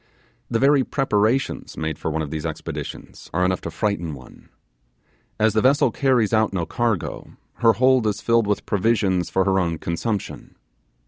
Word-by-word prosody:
The 115 - +1
very 135 +2 +4
preparations 125 -1 0
made 80 -1 -3
for - - -2
one 80 0 -2
of 70 - -6
these 80 -1 -4
expeditions - - -7
are 90 +1 +2
enough 90 -1 0
to - - -5
frighten 85 -8 -2
one. 65 -1 -15 0.9
As 110 -1 +3
the 110 - +2
vessel 135 +4 +3
carries 125 -6 +1
out 110 -1 +3
no 90 -4 -2
cargo, 115 -1 -3 0.2
her 115 -1 +4
hold 130 -1 +3
is 105 -1 -1
filled 115 -2 +2
with 105 - -1
provisions 100 -3 +1
for 95 - +1
her 95 -1 +2
own 85 -3 -1
consumption. 95 +6 -4
105 Hz, 170 wpm, -22 LUFS, 90-115 Hz, 0.9 s, very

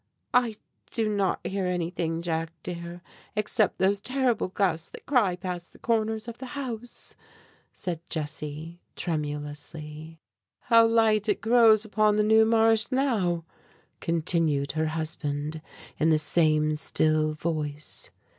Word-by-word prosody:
"I 240 -3 +3 0.3
do 225 -2 0
not 200 -3 0
hear 195 -1 -1
anything, 170 -2 -2
Jack, 165 -1 -1
dear, 170 0 -6 0.3
except 210 0 +1
these 195 +2 +2
terrible 255 -1 +1
gusts 180 -4 0
that - - -12
cry 230 -10 +3
past 180 -1 -6
the - - -15
corners 220 -1 0
of 235 0 -7
the 260 - -6
house," 245 -3 -6 0.6
said 175 -3 -4
Jessie, 155 +2 -5
tremulously. 150 0 -5 0.4
"How 230 -2 +5
light 220 -2 +3
it 205 - +2
grows 225 -2 +5
upon 215 -1 +2
the 210 - +3
New 220 +1 +5
Marsh, 225 0 +4
now!" 215 -11 +1 0.5
continued 160 -4 +1
her 155 +1 0
husband, 155 -1 -3 0.4
in 160 - +3
the 155 - +5
same 155 -1 +2
still 155 0 +1
voice. 150 -2 -4
175 Hz, 125 wpm, -27 LUFS, 155-220 Hz, 0.6 s, How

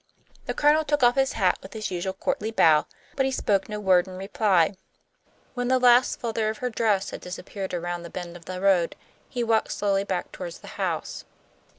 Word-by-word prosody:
The - - -2
Colonel 300 +2 +4
took 295 -2 0
off 240 0 +6
his 270 0 +1
hat 190 -5 +1
with 190 - -11
his 215 -2 -4
usual 185 +1 -2
courtly 205 +2 -2
bow, 160 -8 +4 0.3
but 270 -1 +2
he - - -1
spoke 200 -6 0
no 210 0 -4
word 185 -3 +3
in 185 -1 -8
reply. 195 -2 +2 0.8
When 245 -1 -2
the 260 +1 +3
last 250 0 +4
flutter 225 -2 -1
of 220 - -4
her 250 -1 -3
dress 210 -3 +1
had - - -7
disappeared 190 +2 -6
around 175 0 -3
the 170 - -9
bend 175 -1 -7
of 170 -1 -12
the 185 +1 -5
road, 185 -3 +2 0.3
he 245 -3 -2
walked 225 -1 +1
slowly 200 -1 0
back 190 -3 -3
toward 175 -2 -6
the - - -13
house. - - -3
200 Hz, 205 wpm, -25 LUFS, 185-240 Hz, 0.8 s, off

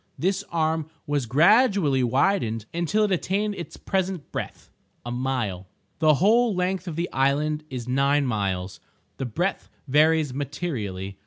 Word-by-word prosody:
This 190 +3 0
arm 160 -1 0 0.2
was 145 -4 -1
gradually 170 - +4
widened 120 - +1
until 175 +6 +1
it 210 - +1
attained 200 +3 0
its 175 -4 -8
present 190 -4 -2
breadth—a 120 - -8
mile. 120 -7 -2 0.3
The 155 -2 +5
whole 220 - +3
length 180 0 -1
of 165 - -4
the 170 +2 -1
island 150 +3 +1
is 125 -2 -6
nine 140 +2 +2
miles; 95 -5 -2 0.4
the 135 - -3
breadth 175 - -2 0.2
varies 155 0 +3
materially. 115 - -4
150 Hz, 135 wpm, -25 LUFS, 125-180 Hz, 0.4 s, The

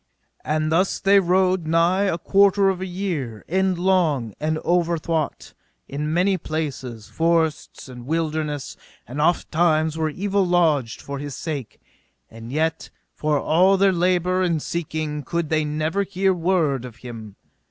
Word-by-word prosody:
And 155 +1 -1
thus 185 +4 +1
they 200 +1 +5
rode 185 -1 +2
nigh 170 +4 +3
a 180 -4 0
quarter 195 +2 +4
of 185 -1 -2
a 190 - -3
year, 170 - -4
endlong 180 - +1
and 155 +1 -1
overthwart, 170 -3 -1 0.3
in 150 +2 -3
many 185 +3 +2
places, 135 -9 -5
forests 165 -3 -1
and 125 -1 -10
wilderness, 155 -2 -2 0.3
and 135 +6 -4
oft 170 +2 +1
times 160 -1 +2
were 160 -1 +1
evil 195 +5 0
lodged 160 -9 +1
for 140 -1 -5
his 145 -1 -6
sake; 145 -8 -5 0.5
and 115 +1 -10
yet 160 +2 -1 0.2
for 150 -1 0
all 185 +7 +3
their 195 0 +4
labour 180 +1 +1
and 170 -4 0
seeking 155 -3 -3
could 170 +3 -3
they 155 -1 +1
never 155 +5 -1
hear 195 -1 +1
word 165 -7 +1
of 125 -3 -9
him. 110 -4 -8
160 Hz, 145 wpm, -22 LUFS, 150-180 Hz, 0.5 s, they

